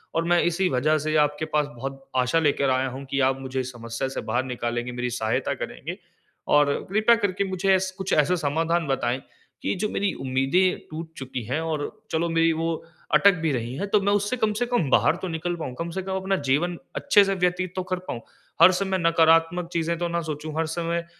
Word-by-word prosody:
और 165 - +2
मैं 175 - +5
इसी 175 +2 +1
वज़ह 150 +4 +2
से 155 +1 -1
आपके 150 +1 +1
पास 150 -1 +2
बहुत 135 +2 -6 0.2
आशा 125 +7 +2
लेकर 140 -3 +2
आया 130 +1 +1
हूँ 140 - -8
कि 140 - 0
आप 135 0 -2
मुझे 130 0 -3
इस 130 0 -6
समस्या 115 +2 -4
से 135 - -4
बाहर 120 +4 -1
निकालेंगे, 120 -1 -3
मेरी 125 0 -2
सहायता 120 +2 -1
करेंगे। - - -6 0.6
और 145 -1 +4 0.2
कृपया 220 +3 +5
करके 200 -2 0
मुझे 190 +1 +2
एस 190 0 0
कुछ 190 -1 -2
ऐसा 150 +4 +3
समाधान 165 +2 0
बताएँ 130 -1 0 0.4
कि - - 0
जो 210 - +1
मेरी 200 -1 -1
उम्मीदें 135 +8 +2
टूट 160 +1 -7
चुकी 130 -3 -5
हैं। 140 +7 -1
और 155 -3 -2 0.2
चलो 165 +1 0
मेरी 165 0 +3
वो 165 +1 -1 0.4
अटक 200 -1 +6
भी 155 - +2
रही 120 0 -3
हैं 200 +7 -3
तो 210 - +4
मैं 200 +1 +2
उससे 205 +5 0
कम 220 -2 +1
से - - +3
कम 210 - 0
बाहर 165 - +4
तो 185 - -3
निकल 175 +1 -2
पाऊँ। 130 -6 -5
कम 170 0 -3
से 190 +2 -3
कम 190 0 -3
अपना 190 +1 0 0.2
जीवन 170 +4 +1 0.2
अच्छे 210 -8 +5
से 195 - 0
व्यतीत 180 0 0
तो 185 - -2
कर 185 - +1
पाऊँ। 115 - -4 0.4
हर 185 - +10
समय 190 0 0
नकारात्मक 165 +1 +3
चीज़ें 170 0 0
तो 175 - 0
ना 170 0 -1
सोचू 155 +1 -4
हर 165 - +1
समय 170 +1 -2
165 Hz, 220 wpm, -25 LUFS, 135-180 Hz, 0.6 s, हर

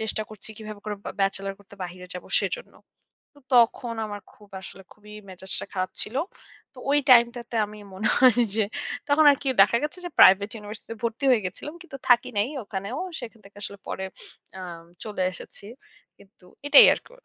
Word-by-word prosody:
চেষ্টা 220 0 -1
করছি 215 0 -10
কিভাবে 215 -1 -9
করে 210 -1 -4
ব্যা - - -5
ব্যাচেলর 195 0 0
করতে 200 0 -16
বাহিরে 180 +1 -9
যাব 180 - -7 0.2
সেজন্য। - - -4 0.6
তো 285 - -19 0.2
তখন 235 0 +3
আমার 205 -1 -7
খুব 210 -1 -19
আসলে 195 0 -11
খুবই 210 0 -16 0.2
মেজাজটা 190 +1 -3
খারাপ 185 0 -1
ছিল। 235 +5 -6 0.6
তো - - -15
ওই 290 - +4
টাইমটাতে 235 0 +4
আমি 210 0 -12 0.2
মনে 195 - -1
হয় 250 -2 +6
যে 220 - +3 0.5
তখন 300 +2 +4
আরকি 275 0 -2
দেখা 220 +4 +3
গেছে 305 +5 -5
যে - - -5
প্রাইভেট 200 +2 +7
ইউনিভার্সিটিতে 215 +1 -8
ভর্তি 235 +4 -2
হয়ে 220 -6 +3
গেছিলাম। 295 - -7
কিন্তু 275 -6 -10
থাকি 245 -1 +5
নাই 210 +5 +2 0.2
ওখানেও। 200 +5 -5 0.2
সেখান 230 -2 -10
থেকে 200 +1 -18
আসলে 200 0 -6
পরে 190 - -4 0.5
আ - - -7 0.4
চলে 210 -3 -3
এসেছি। 190 - -12 0.5
কিন্তু 195 -2 -22 0.2
এটাই 290 0 +9
আরকি। - - -13
215 Hz, 175 wpm, -25 LUFS, 200-245 Hz, 0.6 s, এটাই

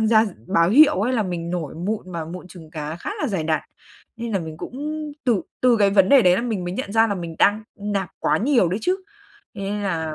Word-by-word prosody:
tham 220 - +2
gia 220 0 +5 0.2
báo 170 +1 +3
hiệu 295 +4 +6
ấy 245 +5 +1
là 230 - +1
mình 175 -3 -4
nổi 170 -5 -3
mụn 185 +2 -4
mà 165 -2 -3
mụn 180 +2 -9
trứng 165 -4 -13
cá 155 -1 -5
khá 175 - -6
là 290 - 0
dày 190 -7 -2
đặc, 155 -1 +1 0.6
nên 235 0 -5
là 195 - +2
mình 160 -3 -7
cũng 245 - -8 0.5
từ 235 -7 +2 0.2
từ 250 -2 +4
cái 200 -1 +4
vấn 195 -1 +4
đề 275 0 +7
đấy 180 -2 +5
là 230 - -1
mình 220 -7 -2
mới 175 - -3
nhận 200 -4 -4
ra 225 +1 +5
là 205 - 0
mình 170 -3 -6
đang 210 +2 +3
nạp 200 -2 -3
quá - - +1
nhiều 235 - +3
đấy 185 - -1
chứ, 365 +8 +1 0.6
thế 205 - -8
nên 205 +1 -3
là 160 -5 -2
195 Hz, 255 wpm, -22 LUFS, 170-220 Hz, 0.6 s, đề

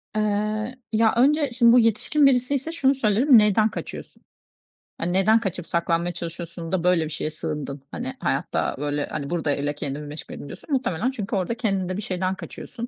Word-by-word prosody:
Eee, 215 +2 -1 0.2
ya, 220 0 +4
önce 290 +3 +4
şimdi 235 -1 +5
bu 245 - +7
yetişkin 230 +6 +3
birisiyse 270 +3 +2
şunu 275 -4 +2
söylerim, 240 +2 +5
"Neden 210 +1 +4
kaçıyorsun? - - -8 0.7
Hani, 175 +1 -2
neden 210 +4 +4
kaçıp 185 -5 -4
saklanmaya 170 0 0
çalışıyorsun 170 0 -6
da 180 -2 0
böyle 180 -2 +3
bir 155 - -5
şeye 155 0 -3
sığındın? 150 -3 -5
Hani, 255 +2 -5
hayatta, - - -1
böyle, 145 0 -1
hani, 140 -2 -5
burada 165 -4 -1
öyle 145 +1 -2
kendimi 145 0 -5
meşgul 150 +2 -8
edeyim 145 - -8
diyorsun. 195 - -11
Muhtemelen 250 -4 0
çünkü 210 -6 -4
orada 190 +4 -1
kendinde 195 -5 -1
bir - - -3
şeyden 185 -1 -2
kaçıyorsun. 235 +4 -8
195 Hz, 175 wpm, -24 LUFS, 165-235 Hz, 0.7 s, bu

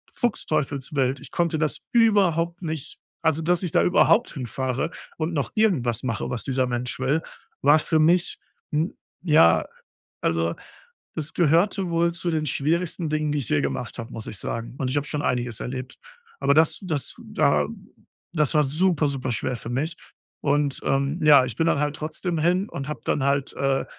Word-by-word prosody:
fuchsteufelswild. 140 - -1
Ich 140 - -13
konnte 170 -2 0
das 155 -1 0
überhaupt 180 -7 +3
nicht 160 -5 -5 0.3
also, 160 0 +2
dass 175 +2 +1
ich 175 - -2
da - - +4
überhaupt 210 +6 +4
hinfahre 130 +2 -2 0.3
und 160 +2 -1
noch 145 -4 -2
irgendwas 145 - +1
mache 115 -4 -2
was 125 - -3
dieser 130 -1 0
Mensch 125 +1 -3
will, 135 +5 +1 0.4
war 145 +3 +6
für 160 - 0
mich 170 +3 +3 0.4
‘n, 155 +3 0 0.2
ja 115 - +5 0.6
also, 85 0 0 0.6
es 155 +1 -4
gehörte 175 +3 +2
wohl 170 0 +2
zu 170 0 -2
den 155 -1 -1
schwierigsten 165 +4 -1
Dingen 155 -1 0
die 150 - 0
ich 125 - -5
je 75 - +2
gemacht 70 -1 -3
habe 115 - -7
muss 115 - -6
ich 105 - -5
sagen. 115 +3 -4
Und, 130 - -1
ich 145 - 0
habe 145 - 0
schon 150 - -2
einiges 120 -3 -1
erlebt. 130 0 -6 0.4
Aber - - +3
das 160 0 +4
das 155 -8 -3
da 75 -1 +1 0.7
das 150 -5 +1
war 150 - +5
super 155 +2 +2
super 130 -3 -2
schwer 125 +2 -1
für 115 - -8
mich. 150 +7 -2 0.5
Und, 145 -1 +1
ähm, 140 +4 0
ja, 145 -4 +7
ich 120 -4 -5
bin 165 +6 +1
dann 145 - +2
halt 145 0 0
trotzdem 160 +3 -3
hin 180 +5 +2
und 140 0 -6
habe 150 -6 -5
dann 145 - 0
halt, 140 0 0
äh 135 -1 0
150 Hz, 180 wpm, -24 LUFS, 130-165 Hz, 0.7 s, ja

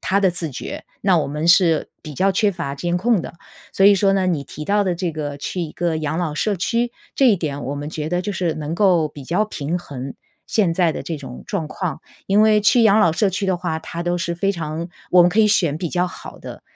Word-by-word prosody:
他 195 +2 +1
的 190 -2 +4
自 170 -2 -3
觉， 125 - -7 0.2
那 185 -4 +3
我 - - 0
们 150 +3 -3
是 170 -3 +4
比 150 - -9
较 195 +8 +2
缺 205 +2 +2
乏 165 -6 -4
监 175 +4 -1
控 220 0 +2
的。 - - -8 0.4
所 195 - +2
以 200 0 +8
说 195 0 +3
呢， 190 -1 +1
你 150 -5 -1
提 150 - -8
到 205 +4 +2
的 180 -2 0
这 175 -1 -2
个 145 -2 -5
去 180 +5 -4
一 160 -3 -4
个 170 -2 -1
养 155 0 -2
老 165 -4 -1
社 205 +6 0
区， 235 +6 0 0.3
这 270 -2 +5
一 205 - +4
点 145 -5 -4
我 140 +3 -3
们 145 +2 -5
觉 155 0 -4
得 175 +1 0
就 205 - -3
是 170 -3 -1
能 155 +1 -4
够 175 -6 +3
比 145 -2 -11
较 180 +9 +1
平 165 -5 -3
衡， 135 -6 -7 0.3
现 195 -7 +2
在 170 -2 +2
的 - - -5
这 165 - -4
种 130 -3 -9
状 180 -7 -3
况。 175 0 -4 0.3
因 200 +2 +4
为 215 -1 +5
去 230 +3 +4
养 215 0 +5
老 170 -6 +5
社 195 +5 +1
区 190 +2 -2
的 190 -2 +1
话， 165 -2 -3
它 170 - -7
都 175 0 0
是 170 0 -2
非 195 +3 0
常 165 -1 -4 0.2
我 180 -1 +7
们 175 - +5
可 210 +5 +2
以 210 - +5
选 170 -8 +2
比 170 +1 -3
较 180 +2 0
好 185 - -10
的。 - - -10
175 Hz, 275 characters per minute, -21 LUFS, 155-195 Hz, 0.4 s, 以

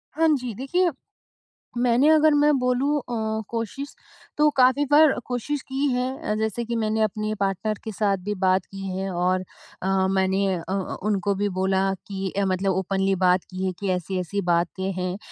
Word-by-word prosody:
हाँ 325 +1 +3
जी। 245 -3 -5
देखिए, 350 - +1 0.9
मैंने 245 +3 +3
अगर 310 -1 +5
मैं 295 +1 +4
बोलूँ 255 +4 +1
अ, 245 - -8 0.4
कोशिश 235 +5 -4 0.4
तो 300 0 +5
काफ़ी 260 +3 +5
बार 305 -1 +7
कोशिश 260 +3 -3
की 270 +2 0
है 250 0 0 0.3
अ, - - +1
जैसे 220 +2 -1
कि 235 +1 -3
मैंने 220 -1 0
अपने 215 0 -1
पार्टनर 200 +2 -1
के 220 - -5
साथ 200 -1 +1
भी 210 - -1
बात 185 0 +3
की 195 0 -8
है 195 0 -2
और 180 +1 0 0.4
अ, 190 0 +1
मैंने 190 +1 +1
अ 170 - -4
अ, 190 -1 -2
उनको 200 -1 +1
भी 205 +1 0
बोला 190 0 +2 0.2
कि 195 -1 -3
अ, 200 - +2
मतलब 190 +1 0
ओपनली 195 +1 0
बात 180 0 +4
की 185 0 -4
है 185 - 0
कि 200 - -2
ऐसी-ऐसी 185 +2 -2
बातें 175 +3 0
हैं। 180 +1 -2
200 Hz, 180 wpm, -24 LUFS, 190-250 Hz, 0.9 s, बार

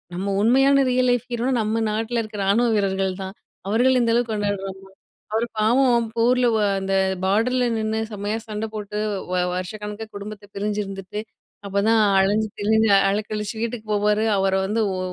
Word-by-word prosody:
நம்ம 195 +2 -3
உண்மையான 270 +3 +4
real 250 0 +2
life 245 0 0
ஹீரோனா 240 +2 -1
நம்ம 220 +1 -1
நாட்டில 225 +2 -1
இருக்கிற 215 -1 -8
ராணுவ 230 +5 +3
வீரர்கள் 195 -2 0
தான். 190 +1 -7 0.3
அவர்கள 245 +6 +3
இந்த 230 -1 +2
அளவுக்கு 235 -1 +1
கொண்டாடுரோம்மா? 205 -2 -2 0.6
அவரு 230 +2 +1
பாவம், 235 +1 +3
போர்ல 245 +2 +3
வ 220 - +2 0.2
அந்த 195 0 -2 0.3
பாடர்ல 245 +6 +2
நின்னு 220 0 -1
செம்மையா 205 +1 -3
சண்ட 215 0 -3
போட்டு, 210 -1 -5 0.3
வ - - 0 0.2
வருஷக்கணக்கா 210 +4 -5
குடும்பத்தை 205 0 -8
பிரிஞ்சிருந்துட்டு, 205 -1 -3 0.5
அப்போதான் 215 +3 +2 0.2
அலஞ்சி 210 +3 +1
திரிஞ்சு 220 +1 +3 0.2
அலக்கழிச்சி 210 +1 -3
வீட்டுக்கு 230 -1 -4
போவாரு, 210 +1 +2
அவர 195 0 +1
வந்து 215 +3 0 0.2
ஒ - - -3
215 Hz, 150 wpm, -22 LUFS, 205-230 Hz, 0.6 s, உண்மையான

